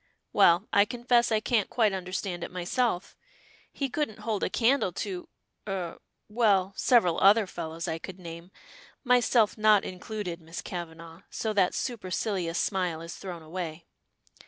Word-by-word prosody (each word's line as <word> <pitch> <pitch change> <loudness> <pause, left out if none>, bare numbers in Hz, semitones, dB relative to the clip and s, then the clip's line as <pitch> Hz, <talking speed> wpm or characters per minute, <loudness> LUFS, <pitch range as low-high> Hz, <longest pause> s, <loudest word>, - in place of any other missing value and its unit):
"Well, 175 +5 +5
I 200 - +7
confess 240 +1 +2
I 220 - +3
can't 215 -2 +1
quite 220 -5 +2
understand 185 -1 -4
it - - -4
myself. 185 +2 -1 0.6
He 275 - -2
couldn't 265 -5 -3
hold 215 -3 -2
a - - +1
candle 245 -4 +2
to 185 -1 -5 0.4
er 185 -4 -4 0.3
well, 205 -4 +2
several 200 -9 +3
other 205 +2 +6
fellows 165 -2 -6
I 165 -1 -2
could 190 +2 -8
name, 170 -1 -9 0.5
myself 245 -4 +3
not 215 -2 +5
included, 185 -2 -5
Miss 165 +1 -7
Kavanagh, 165 -1 -7
so 220 -1 -2
that 195 -3 +2
supercilious 190 -6 -2
smile 180 -5 0
is 165 +1 -8
thrown 175 -4 -7
away. 165 0 -6
190 Hz, 145 wpm, -28 LUFS, 175-220 Hz, 0.6 s, I